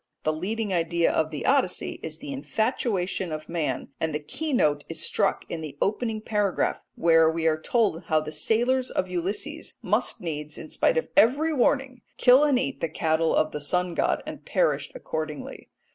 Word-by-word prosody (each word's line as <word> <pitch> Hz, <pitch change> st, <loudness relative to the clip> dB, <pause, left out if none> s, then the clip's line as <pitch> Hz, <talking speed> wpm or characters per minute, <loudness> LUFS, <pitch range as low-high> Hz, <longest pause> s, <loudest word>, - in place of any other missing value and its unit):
The 155 Hz, -, +1 dB
leading 205 Hz, +5 st, -2 dB
idea 170 Hz, 0 st, +2 dB
of 155 Hz, -1 st, +1 dB
the 150 Hz, -2 st, -5 dB
Odyssey 275 Hz, 0 st, +1 dB
is -, -, -6 dB
the 290 Hz, -1 st, -7 dB
infatuation 220 Hz, -, -1 dB
of 155 Hz, 0 st, -5 dB
man, 165 Hz, -3 st, -2 dB
and 160 Hz, -2 st, -1 dB
the -, -, 0 dB
key 310 Hz, -, -4 dB
note 150 Hz, -, +2 dB
is 165 Hz, -, -5 dB
struck 200 Hz, -2 st, 0 dB
in 165 Hz, -, -5 dB
the 145 Hz, -3 st, -7 dB
opening 220 Hz, +1 st, -1 dB
paragraph, 210 Hz, -3 st, 0 dB
where 165 Hz, -1 st, +5 dB
we 165 Hz, 0 st, -2 dB
are 155 Hz, -1 st, +2 dB
told 215 Hz, -7 st, +1 dB
how 155 Hz, -1 st, +3 dB
the 155 Hz, 0 st, -6 dB
sailors 245 Hz, +8 st, +1 dB
of 185 Hz, -, -1 dB
Ulysses 200 Hz, -, -3 dB
must -, -, +1 dB
needs, 150 Hz, -3 st, -5 dB
in 155 Hz, -, -9 dB
spite -, -, +2 dB
of 485 Hz, -, 0 dB
every 295 Hz, +4 st, +4 dB
warning, 260 Hz, -1 st, +1 dB, 0.2 s
kill 255 Hz, +3 st, +6 dB
and 290 Hz, -3 st, +4 dB
eat 270 Hz, +2 st, -2 dB
the 165 Hz, -, 0 dB
cattle 160 Hz, +1 st, +1 dB
of 155 Hz, -, +2 dB
the 150 Hz, -, -5 dB
sun 180 Hz, +4 st, 0 dB
god, -, -, 0 dB
and -, -, -8 dB
perished -, -, 0 dB
accordingly. 155 Hz, -, -5 dB
180 Hz, 185 wpm, -26 LUFS, 160-250 Hz, 0.2 s, kill